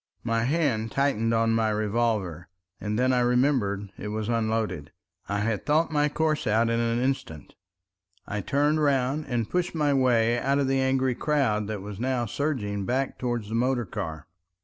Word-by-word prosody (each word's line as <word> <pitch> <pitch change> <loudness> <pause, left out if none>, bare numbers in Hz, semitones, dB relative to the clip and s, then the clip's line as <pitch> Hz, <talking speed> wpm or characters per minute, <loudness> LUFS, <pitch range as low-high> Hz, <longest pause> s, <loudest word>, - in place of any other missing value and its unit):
My 115 0 0
hand 130 -7 0
tightened 135 -5 +1
on 115 0 +2
my 110 -1 +2
revolver, 105 -5 -1 0.3
and 105 +1 -2
then 130 +1 +2
I 125 - +3
remembered 120 -6 +1
it 105 - -5
was 110 +1 -3
unloaded. 110 -9 -1 0.4
I 100 0 0
had 110 -1 -1
thought 155 +3 +2
my 150 -1 +2
course 155 -2 0
out 115 +2 +2
in 115 - +1
an 115 0 +1
instant. 125 - -3 0.7
I 105 0 -3
turned 145 +7 +1
round 140 +1 +1
and 120 -4 -1
pushed 180 +2 -1
my 150 -2 +2
way 120 -3 +3
out 140 +2 +1
of 140 -1 +1
the 135 0 +1
angry 130 -1 +1
crowd 120 -8 0
that 105 -3 -4
was 100 -1 -7
now 125 -1 0
surging 115 -5 -2
back 130 +6 -1
towards 120 -4 -2
the - - -5
motor 120 +1 +1
car. 80 -4 -5
120 Hz, 175 wpm, -26 LUFS, 105-135 Hz, 0.7 s, I